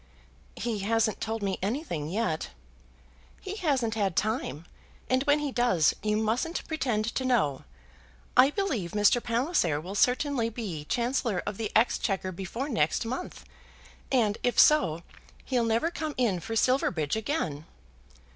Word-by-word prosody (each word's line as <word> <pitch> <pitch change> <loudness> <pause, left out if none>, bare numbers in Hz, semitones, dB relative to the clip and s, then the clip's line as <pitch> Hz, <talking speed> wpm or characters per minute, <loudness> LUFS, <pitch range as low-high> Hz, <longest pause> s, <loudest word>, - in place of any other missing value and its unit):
"He 230 -3 -2
hasn't 220 +2 +1
told 220 -1 -3
me 195 -1 -1
anything 195 - -2
yet." 180 -5 -1 0.9
"He 390 +2 -6
hasn't 270 - 0
had 200 -6 0
time; 215 - -1 0.5
and 255 0 +3
when 290 0 +4
he 295 -2 -2
does, 240 -11 +3
you 210 0 0
mustn't 230 +10 -1
pretend 245 -9 -1
to 260 - -1
know. 215 - +1 0.7
I 255 +2 +7
believe 275 - -2
Mr. 210 +3 +4
Palliser 230 - +1
will 180 +5 -7
certainly 250 +2 +2
be 200 -10 -5
Chancellor 235 - -1
of 205 - -4
the 220 -2 -3
Exchequer 195 -4 +1
before 195 +9 -5
next 160 - 0
month, 255 +10 -5 0.7
and, 220 -6 +2
if 245 - 0
so, 175 - +5 0.4
he'll 245 -3 +1
never 230 +9 +1
come 315 -3 -4
in 225 -8 +1
for 225 +7 -5
Silverbridge 210 - +1
again." 195 - -2
225 Hz, 140 wpm, -28 LUFS, 195-255 Hz, 0.9 s, I